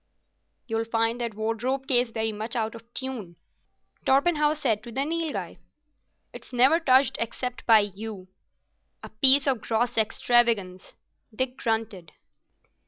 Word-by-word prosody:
"You'll 225 -1 -2
find 225 +1 0
that 230 -3 -3
wardrobe 225 +5 -2
case 250 -3 +3
very 225 -1 -3
much 220 +3 -5
out 220 -2 -2
of 230 +1 -14
tune," 245 -10 -6 0.7
Torpenhow 300 +2 +2
said 230 -8 -1
to 235 - -10
the 270 +4 -1
Nilghai. 325 0 -4 0.8
"It's - - -10
never 260 +6 +4
touched 265 -5 +3
except 250 +2 -5
by 225 -2 +7
you." 205 -1 -7 0.8
"A - - -9
piece 265 +5 +6
of 260 -6 0
gross 225 +2 -1
extravagance," 220 -4 +1 0.4
Dick 255 +2 -2
grunted. 220 -7 -3
235 Hz, 130 wpm, -25 LUFS, 220-260 Hz, 0.8 s, by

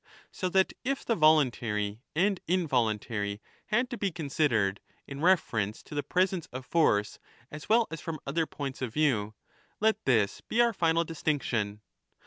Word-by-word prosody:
So 185 - -2
that 190 +1 +2
if 275 +2 -2
the 230 - +2
voluntary 120 - +2
and 190 +3 +2
involuntary 110 - 0 0.3
had 240 +4 +1
to 240 - -5
be 200 -2 0
considered 140 - 0
^ - - -35
in 140 0 -8
reference 115 - +1
to - - -12
the 145 - 0
presence 185 +1 0
of 130 +1 -8
force 105 -10 +2 0.3
as 150 -1 -9
well 230 +1 +5
as 165 - -6
from 160 -2 -5
other 160 +3 0
points 135 -2 -6
of 125 -3 -2
view, 115 -9 +1 0.4
let 220 +1 +2
this 110 -6 +2
be 230 - -3
our 235 -1 +4
final 165 -2 +2
distinction. 130 -10 -2
150 Hz, 160 wpm, -29 LUFS, 110-180 Hz, 0.4 s, well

